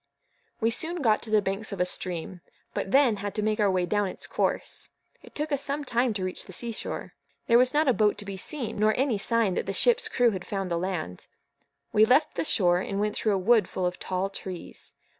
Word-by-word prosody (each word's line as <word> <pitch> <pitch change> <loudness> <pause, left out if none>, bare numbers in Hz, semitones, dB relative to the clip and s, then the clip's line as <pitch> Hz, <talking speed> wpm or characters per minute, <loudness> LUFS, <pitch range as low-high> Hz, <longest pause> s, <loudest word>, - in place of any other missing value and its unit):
We 225 +1 +2
soon 325 +6 +1
got 215 -3 +3
to 225 - -5
the 215 -1 +3
banks 195 +3 -2
of 200 - -5
a 180 - +3
stream; 180 -1 -4 0.3
but - - -3
then 255 -2 +4
had 205 0 -5
to 210 - -1
make 215 0 0
our 205 -1 +3
way 185 -1 +1
down 205 +2 0
its - - -6
course. - - -2 0.3
It - - -17
took 300 +1 -3
us 285 -1 +1
some 285 +1 -2
time 245 0 +1
to 190 - -2
reach 185 0 -3
the 190 - -9
sea 235 +6 -3
shore. 220 - -5 0.3
There 235 +1 +5
was 255 0 +4
not 300 +2 +2
a 260 - +5
boat 210 -2 +2
to 205 - -7
be 200 -1 -5
seen, 225 +1 -3
or 215 0 +4
any 255 -5 +1
sign 230 -2 +2
that - - -3
the 195 - -2
ship's 485 - +3
crew 245 -2 +2
had 185 -3 -5
found 195 -2 -4
the 170 - 0
land. 175 - -4 0.7
We 215 - +5
left 270 +7 +4
the - - -1
shore, 180 - +2
and 195 +1 -3
went 210 0 -1
through 215 -2 +1
a - - +1
wood 220 +4 +3
full 185 - -2
of 180 0 -2
tall 190 +1 -2
trees. 185 -3 -7
210 Hz, 240 wpm, -27 LUFS, 190-240 Hz, 0.7 s, There